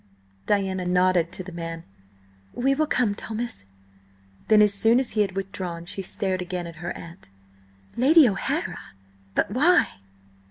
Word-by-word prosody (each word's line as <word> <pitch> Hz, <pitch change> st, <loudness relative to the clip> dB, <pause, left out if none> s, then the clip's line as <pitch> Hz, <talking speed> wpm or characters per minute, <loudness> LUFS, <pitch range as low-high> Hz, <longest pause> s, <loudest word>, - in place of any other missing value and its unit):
Diana 190 Hz, -2 st, 0 dB
nodded 180 Hz, -1 st, +2 dB
to 185 Hz, -, -6 dB
the 185 Hz, -, -9 dB
man. 165 Hz, -1 st, -6 dB, 0.7 s
"We 270 Hz, +3 st, +2 dB
will 310 Hz, +2 st, 0 dB
come, 240 Hz, -8 st, +1 dB
Thomas." 220 Hz, -, -6 dB, 0.8 s
Then 215 Hz, -1 st, +6 dB
as 205 Hz, -1 st, +3 dB
soon 225 Hz, +4 st, +4 dB
as 260 Hz, -, -2 dB
he 215 Hz, -, +1 dB
had 195 Hz, -2 st, 0 dB
withdrawn, 185 Hz, -3 st, -5 dB
she 195 Hz, -, -4 dB
stared 190 Hz, 0 st, -2 dB
again 180 Hz, -1 st, -4 dB
at 170 Hz, -1 st, -9 dB
her 175 Hz, +2 st, -5 dB
aunt. 170 Hz, -, -12 dB, 0.7 s
"Lady 285 Hz, +4 st, +6 dB
O'Hara! 195 Hz, -4 st, -2 dB, 0.6 s
But -, -, +1 dB
why?" 305 Hz, -, +3 dB
195 Hz, 150 wpm, -24 LUFS, 175-230 Hz, 0.8 s, Then